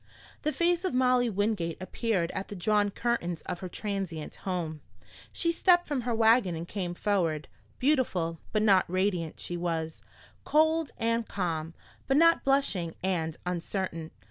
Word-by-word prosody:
The 305 - 0
face 345 +2 +1
of 370 -9 -1
Molly 250 -1 +3
Wingate 205 -5 -1
appeared 185 -2 -1
at 195 - -4
the 205 - -7
drawn 205 +2 +2
curtains 195 -7 -1
of 175 - -5
her 185 - -6
transient 190 -6 -4
home. 170 -5 -3 0.5
She 335 - 0
stepped 350 +1 +4
from 285 -4 -1
her 240 -1 -1
wagon 225 -5 +4
and 165 +1 -5
came 180 -3 -3
forward. 170 -7 0 0.3
Beautiful, 190 - +1
but 215 -1 +1
not 195 -5 +4
radiant, 185 -3 -1
she 175 - -4
was; 165 -2 -3 0.4
cold 315 0 +3
and 230 0 0
calm, 165 -4 -3 0.3
but 270 - +3
not 335 +1 +5
blushing 240 -12 +1
and 165 -4 -1
uncertain. 175 -2 -3
195 Hz, 150 wpm, -29 LUFS, 170-245 Hz, 0.5 s, not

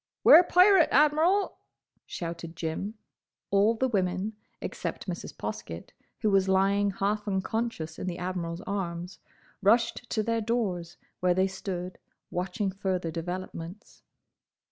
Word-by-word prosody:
"'Ware 340 - +10
pirate, 365 -1 +6
Admiral!" 315 +7 +3 0.5
shouted 170 -1 -6
Jim. 175 +6 -3 0.6
All 205 +3 +4
the 260 +4 +1
women, 190 -1 -1 0.3
except - - -5
Mrs. - - -5
Poskett, - - -6 0.3
who 215 - +2
was 195 -1 +3
lying 195 +1 +3
half 205 +2 -1
unconscious 190 -4 -2
in - - -4
the 175 -1 -3
Admiral's 180 -1 -3
arms, 180 -3 -4 0.4
rushed 230 +3 +2
to 215 - 0
their 230 +1 0
doors, 200 -7 -2 0.2
where 180 -1 +2
they 190 +1 +3
stood, 185 -1 -5 0.3
watching 190 +3 -2
further 185 -3 -2
developments. 175 +2 -6
195 Hz, 120 wpm, -28 LUFS, 180-220 Hz, 0.6 s, Ware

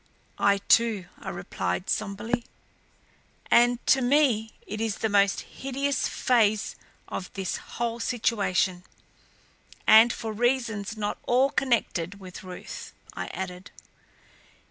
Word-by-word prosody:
"I, 200 0 +4
too," 225 -5 +4
I - - -6
replied 90 - -3
somberly. 220 +4 -2 1.1
"And 240 +1 +5
to 265 - +4
me 245 -5 +2
it 215 +1 -5
is 225 -2 0
the 220 - -1
most 200 -1 +3
hideous 275 +1 -2
phase 220 -4 +2 0.3
of 180 - -6
this 190 -2 -3 0.2
whole 235 0 -1
situation 200 -6 0 1.0
and 225 +2 +8
for 225 -2 -4
reasons 225 -3 0
not 205 -1 -2
all 260 +3 +3
connected 200 -7 0
with 185 -1 -10
Ruth," 185 - -8 0.2
I - - -5
added. 180 0 -6
220 Hz, 115 wpm, -27 LUFS, 200-240 Hz, 1.1 s, and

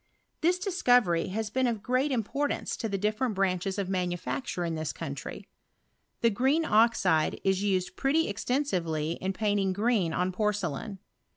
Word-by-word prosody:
This 350 +3 +3
discovery 245 - +2
lias 215 +2 -3
been 260 +1 +1
of 235 - +1
very 210 - -14
great 255 +4 +1
im 240 -4 +1
portance 285 +7 -2
to 225 - -3
different 215 +4 -1
branches 190 0 0
of 200 -2 -1
manufacture 180 +2 -2
in 165 - -2
this 155 -1 -2
country. 140 -4 -7 0.7
The 230 - +4
green 270 +9 +2
oxide 215 -8 +3
is 190 0 +2
used 190 -3 0
pretty 300 +4 +2
esten 250 +7 0
srvely 165 - -2
in 190 - -1
painting 200 -1 0
green 205 -4 +1
on 180 +3 0
porcelain. 210 +1 -2
205 Hz, 160 wpm, -28 LUFS, 185-245 Hz, 0.7 s, The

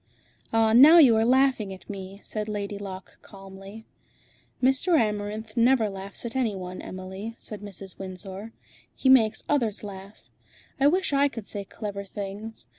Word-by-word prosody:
"Ah! 225 -1 +3
now 290 +8 +9
you 265 -9 +7
are 220 - +3
laughing 255 -5 +3
at 190 - -11
me," 195 -1 -8
said 215 -1 -4
Lady 205 -1 -4
Locke 190 -2 -9
calmly. 195 +2 -12 0.7
"Mr. 270 +6 +3
Amarinth 215 +1 -2
never 235 -3 +3
laughs 195 +3 -7
at 235 - -5
any 235 -6 0
one, 185 -1 -7
Emily," 190 +4 -7
said 210 -2 -8
Mrs. 195 -2 -9
Windsor. 190 +3 -6 0.4
"He 265 - +1
makes 225 -5 +5
others 230 -9 0
laugh. 200 0 -10 0.6
I 275 - +5
wish 365 0 +1
I 280 +1 +4
could 230 -7 -7
say 200 -1 -5
clever 200 -1 -6
things. 200 - -7
210 Hz, 155 wpm, -26 LUFS, 195-235 Hz, 0.7 s, now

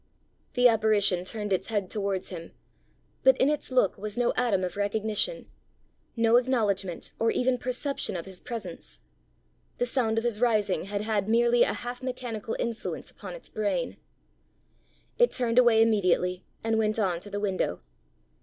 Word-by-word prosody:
The 245 0 +6
apparition 215 -5 +3
turned 210 0 -2
its 190 0 -1
head 205 -4 -1
towards 200 -3 -2
him; 165 -3 -8 0.7
but 265 -1 +5
in 270 - +3
its 300 - -2
look 255 -4 +2
was 210 +1 -5
no 245 -1 +2
atom 220 -7 +1
of 180 - -3
recognition, 215 - -1 0.7
no 230 0 +4
acknowledgment 210 -8 0
or 225 - +2
even 250 +1 +1
perception 255 -1 -2
of 170 - -6
his 190 -2 -10
presence; 205 -8 -7 0.8
the 245 - +1
sound 235 -3 +1
of 225 - +1
his 235 -2 0
rising 210 -7 +2
had 200 +1 -3
had 215 -2 -1
merely 235 +1 +4
a - - +4
half 245 +1 -6
mechanical 245 -4 -4
influence 230 -1 -4
upon - - -9
its - - -10
brain. 215 +4 -1 1.2
It 485 - +5
turned 240 -1 +2
away 230 -3 +6
immediately, 185 -4 +1 0.2
and 225 0 +1
went 215 0 +1
on 185 -6 0
to 205 - -11
the 205 0 -3
window. 190 - -1
220 Hz, 160 wpm, -27 LUFS, 200-245 Hz, 1.2 s, The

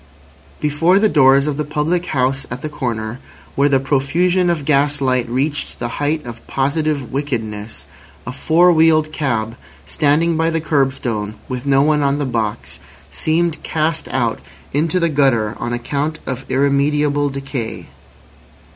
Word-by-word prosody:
Before 150 +5 +2
the 215 +2 +4
doors 135 -5 +5
of 150 -2 -2
the 150 - -1
public 155 +4 -1
house 135 0 0
at 125 +1 -6
the 155 - -3
corner, 120 -5 -4 0.3
where 140 +1 +2
the 135 -1 +3
profusion 170 +7 +1
of 160 -5 -1
gas 145 0 +2
light 130 -3 0
reached 140 +5 -2
the 120 +3 -5
height 150 0 0
of 115 -1 -10
positive 145 0 -1
wickedness, 115 -6 -4 0.4
a 125 - -5
four 170 +6 +4
wheeled 160 -1 +3
cab 115 -7 -2 0.3
standing 155 +3 +1
by 160 +1 +1
the 165 0 0
curbstone 130 -8 -1
with 125 +1 -5
no 135 0 +4
one 150 0 +2
on 140 0 +1
the 145 - -1
box, 115 -4 -3 0.3
seemed 160 - 0
cast 160 0 -1
out 120 -3 -1 0.3
into 160 +5 +1
the 170 - +2
gutter 130 -8 +1
on 120 - -3
account 145 +6 -2
of 130 0 -5
irremediable 145 +1 +1
decay. 135 -4 -5
140 Hz, 150 wpm, -18 LUFS, 130-155 Hz, 0.4 s, doors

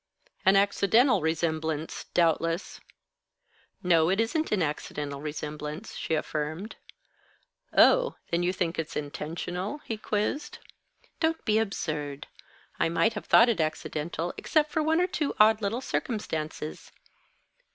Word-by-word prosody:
"An 190 - +7
accidental 200 +3 +4
resemblance, 160 -1 -1
doubtless." 165 +1 +1 1.0
"No, 165 -2 +4
it 195 +3 +1
isn't 310 +8 0
an 195 -5 +2
accidental 145 -1 -4
resemblance," 150 +4 -5
she 160 - -1
affirmed. 155 +6 -3 1.0
"Oh, - - +5 0.2
then 170 0 +2
you 175 +1 +2
think 175 -3 -2
it's 160 - -4
intentional?" 170 - -4
he 225 - -3
quizzed. 215 +8 -2 0.6
"Don't 325 0 0
be 215 -1 +3
absurd. 150 -9 -3 0.5
I - - +2
might 220 +7 +2
have 210 - -7
thought 235 - +7
it 220 -8 +1
accidental, 160 +2 -3
except 305 -2 +1
for 315 - +1
one 320 +2 +2
or 360 - +4
two 310 -5 -2
odd 220 +1 +6
little 220 +5 -1
circumstances. 160 - -4
175 Hz, 125 wpm, -28 LUFS, 155-220 Hz, 1.0 s, An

